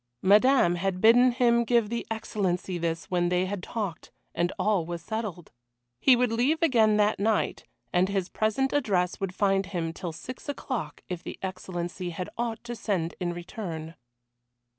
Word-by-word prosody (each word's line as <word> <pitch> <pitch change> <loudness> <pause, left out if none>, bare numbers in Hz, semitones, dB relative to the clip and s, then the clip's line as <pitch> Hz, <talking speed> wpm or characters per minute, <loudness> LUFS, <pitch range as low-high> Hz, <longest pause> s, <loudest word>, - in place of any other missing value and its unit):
Madame 205 -2 +5
had 185 +1 -1
bidden 245 +4 +6
him 235 -1 +3
give 235 -2 +2
the 235 - -3
Excellency 190 -5 -2
this 165 0 -2
when 175 -1 +2
they 180 +1 +2
had 195 0 -4
talked 200 -4 -4 0.2
and 175 +1 0
all 205 -5 +2
was 170 +1 -5
settled. 200 -2 -5 0.5
He 260 - +6
would 245 -1 +1
leave 265 +9 +1
again 225 -8 +4
that 210 -1 +2
night, 215 +1 0 0.3
and 180 +2 +3
his 195 -3 -1
present 220 +7 0
address 190 -11 +1
would 190 -2 -3
find 195 -2 +2
him 170 -4 -3
till 175 0 -5
six 255 - -9
o'clock 230 - -4
if 180 -2 -4
the - - -7
Excellency 180 -1 -4
had 180 +1 -5
aught 230 -1 -3
to 240 0 -5
send 185 -7 -1
in 175 -2 -1
return. 170 -2 -6
195 Hz, 165 wpm, -27 LUFS, 175-230 Hz, 0.5 s, bidden